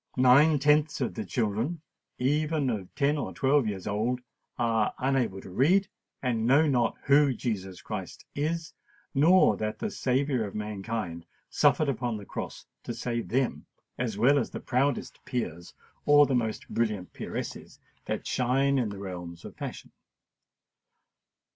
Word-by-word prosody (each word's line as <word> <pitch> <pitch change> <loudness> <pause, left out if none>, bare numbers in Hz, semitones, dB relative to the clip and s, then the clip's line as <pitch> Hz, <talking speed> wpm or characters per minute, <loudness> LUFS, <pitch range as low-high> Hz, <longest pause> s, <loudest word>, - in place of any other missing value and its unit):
Nine 135 +5 +6
tenths 150 +2 +3
of 130 - -1
the - - -4
children, 115 - -1 0.4
even 145 +1 +1
of 100 -5 -5
ten 145 +1 +2
or - - -4
twelve 135 -2 +3
years 100 -3 -4
old, 110 +5 -1 0.4
are 115 -2 +1
unable 130 -7 0
to 95 - -11
read, 175 - +3 0.3
and 115 -3 0
know 140 +5 +5
not 120 -6 +1
who 140 -1 +4
Jesus 95 -6 -4
Christ - - -6
is, 160 +3 -2 0.4
nor 160 - +5
that 110 +1 -3
the 215 - -3
Saviour 130 - 0
of 100 - -10
Mankind 105 -4 -4 0.2
suffered 155 - +3
upon 125 -4 -1
the 100 - -9
cross - - -6 0.2
to - - -5
save 120 -1 -3
them, 130 +1 -1 0.3
as 115 -5 -2
well 135 +6 +5
as 125 - -2
the - - -6
proudest 140 +3 -1
peers 85 - -4 0.3
or 145 0 +7
the 140 - -1
most 110 -3 -1
brilliant 105 -6 -1
peeresses - - -6 0.3
that - - -3
shine 135 +2 +2
in 115 -4 0
the 100 - -7
realms 90 -3 -7
of - - -9
fashion. - - -7
125 Hz, 150 wpm, -28 LUFS, 110-140 Hz, 0.4 s, or